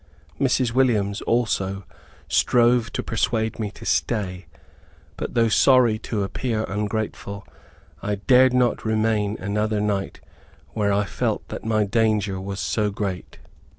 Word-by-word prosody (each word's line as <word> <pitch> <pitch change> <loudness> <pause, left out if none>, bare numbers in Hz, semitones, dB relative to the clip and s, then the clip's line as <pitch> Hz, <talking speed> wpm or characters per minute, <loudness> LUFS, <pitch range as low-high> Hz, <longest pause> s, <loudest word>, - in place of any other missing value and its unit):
Mrs. 130 -3 +2
Williams, 110 -6 +1
also, 100 -5 0 0.4
strove 120 -2 +3
to - - -2
persuade 110 0 -1
me 105 -2 -2
to - - -13
stay. 95 -6 -1 0.7
But, - - -5
though 115 -1 +4
sorry 120 -1 +4
to 105 -3 -3
appear 110 +2 -2
ungrateful, 105 -1 -4 0.6
I 105 - -1
dared 125 +5 +4
not 125 -1 +1
remain 110 -1 0
another 105 +2 -1
night 100 -2 -2 0.5
where 105 -2 0
I 100 +1 +1
felt - - -2
that - - -7
my 110 -1 +2
danger 105 -3 0
was 100 +1 -5
so 85 +6 0
great. 100 -3 -5
110 Hz, 130 wpm, -23 LUFS, 100-115 Hz, 0.7 s, though